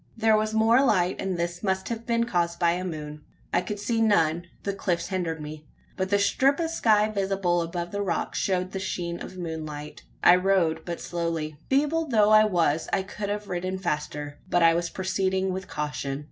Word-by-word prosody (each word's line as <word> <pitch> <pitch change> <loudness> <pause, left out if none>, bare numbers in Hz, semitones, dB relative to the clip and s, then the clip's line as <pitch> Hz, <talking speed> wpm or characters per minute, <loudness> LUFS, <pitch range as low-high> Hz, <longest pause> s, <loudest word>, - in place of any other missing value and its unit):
There 220 -1 +4
was 215 0 +1
more 225 +4 +4
light; 185 -8 +2
and 190 -2 -2
this 175 +1 -3
must 190 -2 -1
have 230 -1 -5
been 235 0 +2
caused 170 -6 0
by 170 -1 +3
a 180 +1 -2
moon. 150 -4 -6 0.3
I 175 - +3
could 205 +3 -5
see 225 +3 -1
none 170 -6 +2 0.2
the 200 - -1
cliffs 175 -3 -2
hindered 175 -4 -2
me 150 0 -8 0.3
but 190 -1 -2
the 205 - +3
strip 270 +8 +2
of 325 -1 -1
sky 215 -9 +3
visible 195 -4 0
above 170 +1 -4
the 205 - -2
rocks 185 -4 -1
showed 185 -1 0
the 190 - -4
sheen 175 -2 -3
of 185 - -8
moonlight. 155 -3 -6 0.2
I 180 - +8
rode 180 -4 +1
but 170 -1 -5
slowly. 165 -3 -3
Feeble 300 +4 +2
though 215 -5 +4
I 215 0 +7
was, 165 -6 +1
I 195 - +1
could 205 +1 -5
have 205 0 -3
ridden 185 +1 -3
faster, 150 -4 -4
but 175 -2 +3
I 165 0 +6
was 170 0 -1
proceeding 190 0 -1
with 190 0 -5
caution. 145 -2 -3
185 Hz, 200 wpm, -26 LUFS, 170-205 Hz, 0.3 s, I